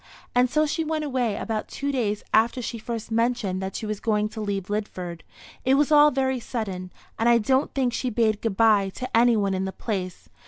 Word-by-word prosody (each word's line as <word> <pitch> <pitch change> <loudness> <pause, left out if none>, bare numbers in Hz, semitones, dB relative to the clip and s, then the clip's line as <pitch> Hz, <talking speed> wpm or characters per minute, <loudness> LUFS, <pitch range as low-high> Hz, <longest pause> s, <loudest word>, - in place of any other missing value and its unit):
And 245 0 +3
so 305 +4 +2
she 320 +2 -1
went 310 0 -2
away 250 -6 0
about 220 -2 -3
two 280 0 -3
days 215 -6 -1
after 230 +4 +3
she 235 -1 -4
first 230 0 -5
mentioned 225 -5 0
that 190 0 -4
she 220 - -4
was 215 -1 -3
going 210 -2 0
to 220 - -7
leave 200 -3 -3
Lidford. 185 -5 -4 0.4
It 260 +1 +4
was 295 +2 +2
all 295 0 +7
very 265 -2 0
sudden, 195 -7 -5 0.3
and 230 +1 +3
I 235 - +6
don't 260 +5 +1
think 255 -3 +1
she 250 +2 -1
bade 220 -2 +1
good 215 -4 -2
bye 215 -4 +4
to 255 -2 -4
any 235 0 +5
one 200 -2 +1
in 190 0 -1
the 190 - -3
place. 185 - -5
225 Hz, 220 wpm, -25 LUFS, 205-255 Hz, 0.4 s, all